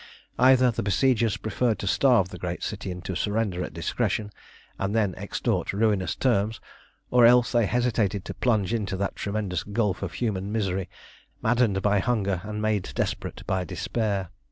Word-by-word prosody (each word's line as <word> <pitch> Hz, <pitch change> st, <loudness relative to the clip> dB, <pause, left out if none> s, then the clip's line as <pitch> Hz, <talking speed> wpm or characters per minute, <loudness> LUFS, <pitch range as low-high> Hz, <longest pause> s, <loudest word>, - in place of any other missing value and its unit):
Either 130 Hz, -1 st, +6 dB
the 110 Hz, -, -3 dB
besiegers 115 Hz, +1 st, +2 dB
preferred 110 Hz, +1 st, 0 dB
to -, -, -5 dB
starve 110 Hz, -2 st, +3 dB
the 90 Hz, -, -9 dB
great 90 Hz, 0 st, -4 dB
city 105 Hz, -2 st, -4 dB
into 90 Hz, +1 st, -5 dB
surrender 105 Hz, -1 st, -1 dB
at -, -, -5 dB
discretion, 105 Hz, +5 st, -2 dB, 0.5 s
and 100 Hz, +2 st, -1 dB
then 105 Hz, -5 st, +2 dB
extort -, -, -2 dB
ruinous 105 Hz, -2 st, +1 dB
terms, 110 Hz, -4 st, +1 dB, 0.5 s
or 125 Hz, -1 st, +5 dB
else 120 Hz, +1 st, +6 dB
they 120 Hz, -4 st, +3 dB
hesitated 110 Hz, -5 st, 0 dB
to -, -, -5 dB
plunge 110 Hz, -4 st, +1 dB
into 100 Hz, -4 st, -2 dB
that 100 Hz, +1 st, -2 dB
tremendous 100 Hz, -3 st, -2 dB
gulf 105 Hz, -2 st, -1 dB
of -, -, -4 dB
human 100 Hz, -4 st, -2 dB
misery, 95 Hz, -4 st, -1 dB, 0.5 s
maddened 110 Hz, -4 st, +2 dB
by 105 Hz, -1 st, +3 dB
hunger 100 Hz, -5 st, 0 dB
and 105 Hz, +1 st, -4 dB
made 105 Hz, -3 st, 0 dB
desperate -, -, -3 dB
by 95 Hz, -1 st, 0 dB
despair. 100 Hz, +1 st, -2 dB
105 Hz, 160 wpm, -26 LUFS, 95-115 Hz, 0.5 s, Either